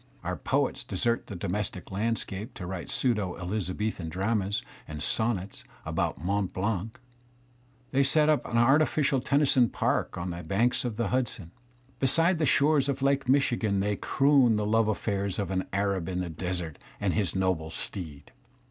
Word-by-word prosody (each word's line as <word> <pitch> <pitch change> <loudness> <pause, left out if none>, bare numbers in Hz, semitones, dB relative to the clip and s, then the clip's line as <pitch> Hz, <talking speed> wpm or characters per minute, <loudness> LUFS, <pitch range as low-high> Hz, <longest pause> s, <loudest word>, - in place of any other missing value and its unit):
Our - - -2
poets - - 0
desert 115 +5 -1
the 100 - -7
domestic 90 +1 -3
landscape 105 +1 -3
to 90 - -6
write 90 -1 -5
pseudo 105 -8 0
Elizabethan 95 0 -3
dramas 100 +3 -1 0.2
and 75 0 -6
sonnets 105 -3 -1 0.2
about - - -1
Mont 95 +3 -1
Blanc. 105 +2 -2 0.9
They 140 +1 +3
set 150 +3 +3
up 155 -1 +3
an 120 - -1
artificial 140 +2 +3
Tennyson 135 -3 +3
park - - -1
on 90 +1 -3
the 85 0 -5
banks 110 +10 +1
of 120 -3 -2
the 115 -4 0
Hudson. 120 -9 -2 0.5
Beside 165 +6 +3
the 155 - +2
shores 145 -1 +4
of 135 0 -2
Lake 140 -1 +1
Michigan 120 -7 +2
they 105 +1 0
croon 135 -1 +3
the 105 0 0
love 110 +1 +3
affairs 100 -2 -1
of 100 -3 -2
an 95 0 -1
Arab 100 -3 0
in 90 -1 -2
the 90 - -3
desert 90 -1 -4 0.2
and 100 -3 0
his 100 -6 0
noble 95 -4 0
steed. 80 -4 -7
105 Hz, 160 wpm, -28 LUFS, 95-125 Hz, 0.9 s, shores